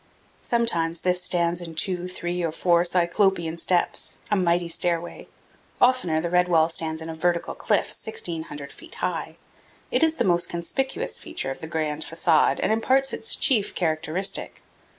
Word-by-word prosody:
Sometimes 170 -9 0
this 180 0 +1
stands 175 -1 +1
in 165 -2 -8
two, 180 +1 0
three, 175 -1 -3
or 165 - 0
four 170 +1 +3
Cyclopean 175 -1 +1
steps 175 +1 0
a - - +4
mighty 175 -2 +2
stairway. 170 0 -2 0.5
Oftener 245 -11 +3
the 170 +1 -3
red 180 0 +3
wall 165 -2 +4
stands 160 -1 -4
in 160 - -7
a - - -6
vertical 170 +1 0
cliff - - 0
1,600 160 -8 -4
feet - - -13
high. - - -3 0.6
It - - +3
is 320 0 +3
the - - 0
most 175 -2 +1
conspicuous 265 - -3
feature 135 - -3
of 135 - -8
the 160 - -5
grand 155 -1 -2
facade 160 -4 +2
and - - +1
imparts 260 +5 +2
its 450 - +1
chief 225 -8 +2
characteristic. 165 +2 -1
175 Hz, 160 wpm, -25 LUFS, 165-185 Hz, 0.6 s, a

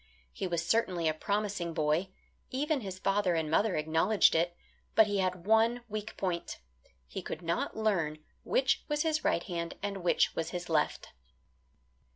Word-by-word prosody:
He - - -3
was 170 -1 -1
certainly 180 -5 +1
a 155 - +2
promising 200 -1 -2
boy, 155 +5 +1 0.4
even 290 +2 0
his 190 -3 -6
father 195 -2 +1
and 160 -2 -1
mother 205 +5 +3
acknowledged 160 +7 +3
it, 170 +1 +1 0.4
but 220 - +7
he 205 -1 -1
had 185 -2 -1
one 225 +3 +3
weak 215 0 -5
point 180 -3 -2 0.5
he 60 - -6
could - - -6
not 170 +5 -1
learn 180 -9 +1 0.2
which 270 +1 +1
was 295 -1 0
his 310 -1 0
right 170 - +1
hand 170 -2 -4
and 200 -1 -2
which 175 -2 +2
was 165 0 -2
his 175 -1 -5
left. 150 -2 0
185 Hz, 165 wpm, -31 LUFS, 170-215 Hz, 0.5 s, but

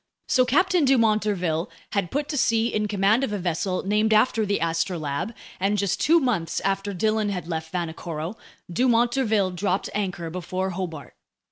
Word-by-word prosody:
So 255 -2 +4
Captain 355 +6 +3
Dumont 230 -6 +4
d'Urville 180 -6 -1 0.2
had 200 -4 0
put 290 +1 -2
to 300 - -2
sea 230 -3 +2
in 210 0 0
command 205 +4 +2
of 270 - -1
a 205 - -1
vessel 185 +1 -1
named 215 +2 +2
after 215 -1 +3
the 200 - +1
Astrolabe, 165 +1 -1 0.3
and 200 +3 +1
just 200 -2 0
two 335 +3 +5
months 225 - 0
after 195 +1 -1
Dillon 215 +2 0
had 180 -4 -4
left 160 -1 -4
Vanikoro, 165 0 -4 0.3
Dumont 240 +4 +2
d'Urville 220 -7 +1
dropped 185 +1 -1
anchor 185 -5 -3
before 185 +2 -3
Hobart. 170 -5 -6
200 Hz, 165 wpm, -24 LUFS, 175-225 Hz, 0.3 s, two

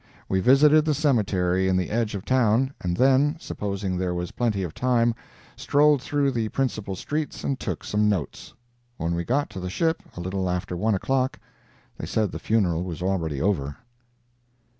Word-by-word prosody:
We 95 - +1
visited 145 +7 +6
the 155 -1 +1
cemetery 95 - +1
in 95 -1 +2
the 90 - -2
edge 110 -1 0
of 100 +1 -6
town, 130 +1 +2
and 90 -1 -2
then, 135 +4 +3
supposing 100 - -3
there 90 -1 -1
was 90 0 -4
plenty 110 -5 -1
of 85 -4 -5
time, 120 -2 +2 0.4
strolled 145 -1 +3
through 140 +2 0
the 115 -3 -1
principal 110 -8 -2
streets 150 +9 -4
and 135 -2 -1
took 90 -7 -4
some 105 0 +1
notes. 90 -10 -3 0.4
When 85 +1 -1
we 85 0 -1
got 140 +9 0
to 95 - -6
the 90 0 -4
ship, 160 - 0 0.2
a - - -5
little 95 +1 -2
after 90 0 -2
one 105 +4 +1
o'clock, 130 +6 0 0.6
they - - -5
said 110 -3 0
the - - -6
funeral 90 -7 +1
was 90 -2 -5
already 85 -7 -1
over. 75 -5 -1
105 Hz, 180 wpm, -25 LUFS, 90-130 Hz, 0.6 s, visited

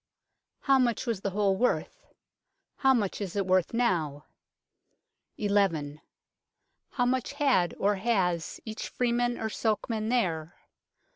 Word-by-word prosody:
How 270 -1 +4
much 240 -2 +1
was 230 -6 -2
the 200 - -1
whole 200 0 +1
worth? 245 +5 -1 0.7
How 270 - +4
much 215 -6 0
is 195 -2 -4
it 200 -1 0
worth 185 -1 +2
now? 165 -11 0 1.1
1 205 -1 -1
1. 155 -7 +1 0.9
How 245 - 0
much 255 +2 0
had 270 -12 +2
or 205 0 +1
has 185 -6 0
each 220 -1 -5
freeman 240 0 0
or 220 - -2
sokeman 220 0 -1
there 175 -9 0
210 Hz, 130 wpm, -28 LUFS, 185-240 Hz, 1.1 s, How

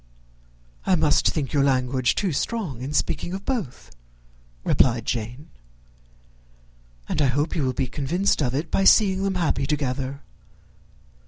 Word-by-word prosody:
"I - - +3
must - - +3
think 140 -4 -3
your 140 -2 +3
language 130 -2 +1
too 195 -4 0
strong 165 - -3
in 135 +3 -4
speaking 175 +3 -1
of 195 +1 -6
both," 225 - -4 0.7
replied 120 -3 +2
Jane; 120 +5 -4 1.6
"and - - -1
I 140 - +4
hope 145 +5 0
you 155 - 0
will 130 - +1
be 135 - -1
convinced 155 +9 0
of 130 -2 0
it, 155 +4 -3
by 195 - +2
seeing 195 -1 +5
them 195 -1 -1
happy 160 -5 0
together. 140 -1 -2
140 Hz, 145 wpm, -24 LUFS, 130-175 Hz, 1.6 s, seeing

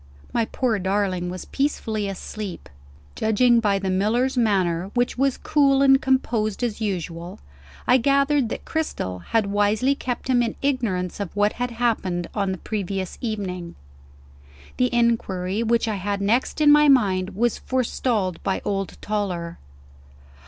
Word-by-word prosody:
My 230 -1 +2
poor 230 -2 -1
darling 190 -2 -1
was 185 +1 -6
peacefully 220 -7 -1
asleep. 195 0 -6 0.5
Judging 235 +2 +3
by 205 -3 +2
the 195 -1 -2
miller's 230 +8 +1
manner, 190 -6 +1
which 245 0 +1
was 270 0 +1
as - - -19
cool 275 -2 +3
and 270 -1 +6
composed 235 -5 0
as 230 -2 -2
usual, 175 -4 -4 0.5
I 250 - +5
gathered 275 0 +2
that - - -6
Cristel 95 - -3
had 225 -2 +2
wisely 205 +6 +2
kept 255 -3 -4
him 250 -2 +3
in 230 -2 -1
ignorance 215 -11 -1
of 200 -2 -5
what 205 0 +2
had 245 +1 -2
happened 225 -7 -1
on 200 -3 0
the 190 - -3
previous 195 -2 -4
evening. 185 -7 -4 1.0
The 250 0 +2
inquiry 220 -5 0
which 230 0 +1
I 215 -2 -1
had 200 +1 -2
next 230 +9 0
in 295 -1 +7
my 300 0 +6
mind 195 -7 +3
was 235 +2 +1
forestalled 235 -7 -1
by 190 - -1
old 195 -1 -2
Toller. 185 -5 -3
215 Hz, 150 wpm, -23 LUFS, 190-245 Hz, 1.0 s, in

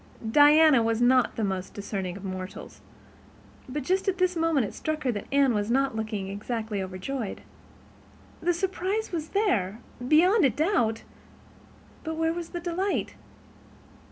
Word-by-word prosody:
Diana 295 -1 +6
was 225 0 0
not 250 +1 +3
the 225 - -2
most 190 -2 -3
discerning 195 -3 -4
of 200 - -11
mortals, 185 0 -7 0.9
but 285 +2 -3
just 375 +7 0
at 385 -1 +1
this 365 -1 +1
moment 325 -6 +2
it - - -7
struck 310 -1 -3
her 255 - +1
that 205 -3 -6
Anne 275 -3 +4
was 205 0 -1
not 270 0 +1
looking 215 -3 -3
exactly 210 +1 -4
overjoyed. 190 +5 -5 1.0
The 350 - +2
surprise 385 +4 -2
was 320 -3 -4
there, 225 - 0 0.3
beyond 320 - +4
doubt—but 305 - -4
where 325 0 0
was 340 -1 -6
the 350 - -5
delight? 355 +3 -2
270 Hz, 140 wpm, -27 LUFS, 210-335 Hz, 1.0 s, Diana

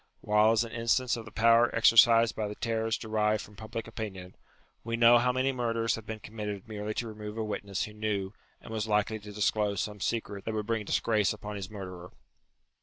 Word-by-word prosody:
While 105 +1 +4
as 115 +1 +2
an 115 - -8
instance 120 +2 +1
of 115 -2 -7
the 105 - -11
power 115 +2 +5
exercised 115 0 +6
by 110 -1 -2
the 105 - -6
terrors 115 0 -1
derived 110 -1 0
from 105 - -14
public 110 +2 -6
opinion, 100 -5 -7 0.5
we 115 0 -2
know 120 +1 +7
how 125 +1 +2
many 130 +2 +1
murders 115 -3 0
have 110 -1 -6
been 110 - -4
committed 105 0 -6
merely 105 0 -5
to 120 - -2
remove 105 0 -7
a 110 - -1
witness 100 -2 -3
who 105 - -7
knew 105 -2 -2 0.3
and 110 - -10
was 110 0 -2
likely 105 +1 +1
to 105 0 -10
disclose 105 -1 0
some 105 +2 -3
secret 100 -2 -3
that 110 - -3
would 105 -1 -2
bring 115 -1 -1
disgrace 105 -1 +1
upon 105 0 -7
his 100 -1 -6
murderer. 90 -4 -8
110 Hz, 205 wpm, -29 LUFS, 105-115 Hz, 0.5 s, know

